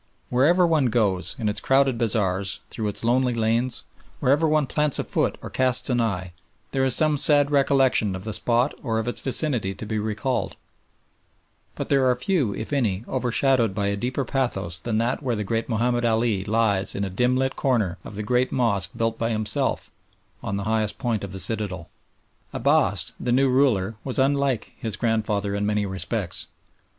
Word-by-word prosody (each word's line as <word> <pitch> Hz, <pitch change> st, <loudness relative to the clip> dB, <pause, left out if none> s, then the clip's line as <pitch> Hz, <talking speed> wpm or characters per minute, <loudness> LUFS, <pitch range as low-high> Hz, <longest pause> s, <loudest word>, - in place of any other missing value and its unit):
Wherever 160 Hz, +9 st, +4 dB
one 155 Hz, -6 st, +2 dB
goes, 105 Hz, -6 st, 0 dB
in 115 Hz, -4 st, -2 dB
its 105 Hz, -, -1 dB
crowded 135 Hz, -2 st, +2 dB
bazaars, 100 Hz, -4 st, 0 dB
through 110 Hz, -, -3 dB
its 105 Hz, -, -4 dB
lonely 125 Hz, +1 st, +2 dB
lanes, 115 Hz, +2 st, 0 dB, 0.4 s
wherever 145 Hz, +5 st, +3 dB
one 155 Hz, -1 st, +2 dB
plants 150 Hz, +2 st, +2 dB
a -, -, 0 dB
foot -, -, -1 dB
or -, -, -7 dB
casts 125 Hz, 0 st, +3 dB
an 120 Hz, -1 st, +2 dB
eye, 90 Hz, -5 st, -2 dB, 0.4 s
there 135 Hz, -1 st, 0 dB
is 130 Hz, -2 st, +4 dB
some 155 Hz, -2 st, +3 dB
sad 145 Hz, -1 st, +4 dB
recollection 135 Hz, -7 st, +2 dB
of 95 Hz, -, -7 dB
the 110 Hz, 0 st, -4 dB
spot 120 Hz, +5 st, +1 dB
or 115 Hz, -4 st, -2 dB
of 110 Hz, +1 st, -2 dB
its 120 Hz, -, 0 dB
vicinity 125 Hz, -7 st, 0 dB
to -, -, -7 dB
be 110 Hz, 0 st, -2 dB
recalled, 110 Hz, +5 st, -2 dB, 1.2 s
but -, -, -5 dB
there 135 Hz, -2 st, +3 dB
are 125 Hz, -, +3 dB
few, 130 Hz, -, 0 dB
if 110 Hz, +7 st, -5 dB
any, 110 Hz, -8 st, 0 dB
overshadowed 125 Hz, -3 st, +1 dB
by 100 Hz, -1 st, 0 dB
a 100 Hz, -, -1 dB
deeper 125 Hz, +5 st, -2 dB
pathos 95 Hz, -10 st, -2 dB
than 110 Hz, +3 st, -2 dB
that 120 Hz, +5 st, 0 dB
where 125 Hz, -4 st, -1 dB
the 105 Hz, -, -2 dB
great 115 Hz, +4 st, -2 dB
Mahomed 120 Hz, +1 st, 0 dB
Ali 110 Hz, -3 st, +1 dB
lies 105 Hz, -3 st, +1 dB
in 100 Hz, -, -2 dB
a 100 Hz, -, -2 dB
dimly 125 Hz, +6 st, +1 dB
lit 130 Hz, -, -3 dB
corner 110 Hz, -10 st, 0 dB
of 100 Hz, -, -10 dB
the 105 Hz, -, -4 dB
great 125 Hz, +4 st, +1 dB
mosque 115 Hz, -7 st, +1 dB
built 115 Hz, 0 st, -1 dB
by 115 Hz, -, 0 dB
himself, 110 Hz, -2 st, -1 dB, 0.5 s
on 100 Hz, -, -3 dB
the 100 Hz, -, -3 dB
highest 110 Hz, 0 st, 0 dB
point 115 Hz, -6 st, -2 dB
of 100 Hz, -, -6 dB
the 95 Hz, -, -5 dB
citadel. 95 Hz, -2 st, -3 dB, 0.6 s
Abbass, -, -, +2 dB
the 125 Hz, -, -2 dB
new 135 Hz, +2 st, +3 dB
ruler, 115 Hz, -6 st, +2 dB
was 130 Hz, -, -3 dB
unlike 135 Hz, -3 st, +1 dB
his 110 Hz, -3 st, -4 dB
grandfather 105 Hz, -3 st, -1 dB
in 100 Hz, 0 st, -2 dB
many 105 Hz, -1 st, 0 dB
respects. 95 Hz, 0 st, -3 dB
115 Hz, 185 wpm, -24 LUFS, 105-130 Hz, 1.2 s, Wherever